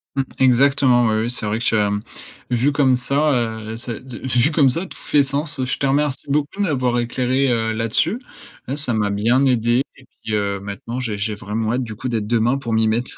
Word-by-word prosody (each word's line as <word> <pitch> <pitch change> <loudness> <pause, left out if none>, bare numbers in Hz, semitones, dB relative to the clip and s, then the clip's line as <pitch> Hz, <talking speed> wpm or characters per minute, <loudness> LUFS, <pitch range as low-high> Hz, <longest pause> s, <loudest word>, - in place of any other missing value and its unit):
Mmh, 135 - +1 0.2
exactement, 130 -1 +4
oui, 110 0 +1
oui, 120 - -2
c'est 125 -3 -4
vrai 105 +1 -1
que - - -5
tu 115 - +1
as, 105 -1 +2
mmh, 105 0 -1 0.5
vu 125 +4 +2
comme 135 -3 +3
ça, 140 +5 +1
heu, 110 -2 -2
c'est 115 -1 -6
de 130 -2 -8
vu 125 +4 +2
comme 145 -3 +4
ça, 165 +9 -2
tout - - -12
fait 145 -1 +2
sens, 145 +1 -1
heu, 130 - 0
je 125 - -2
te 140 - -1
remercie 140 0 0
beaucoup 145 +1 +1
de 205 - -1
m'avoir 130 -8 0
éclairé, 130 +3 0
heu, 115 -1 0
là-dessus. 115 - 0 0.5
Ouais, 135 +3 -3
ça 145 -5 +1
m'a 105 -2 +1
bien 115 +7 +2
aidé 120 0 +2
et 130 - -18 0.2
puis, 110 - -3
heu, 100 -1 -1
maintenant, 100 +5 -6
j'ai 110 -5 -3
j'ai 105 +1 -2
vraiment 110 +2 -3
hâte 130 - 0
du 110 -3 -7
coup 125 +4 -4
d'être 110 -3 -2
demain 120 +3 +2
pour 115 -4 -4
m'y 110 0 +3
mettre. 120 +3 -1
120 Hz, 235 wpm, -20 LUFS, 110-135 Hz, 0.5 s, exactement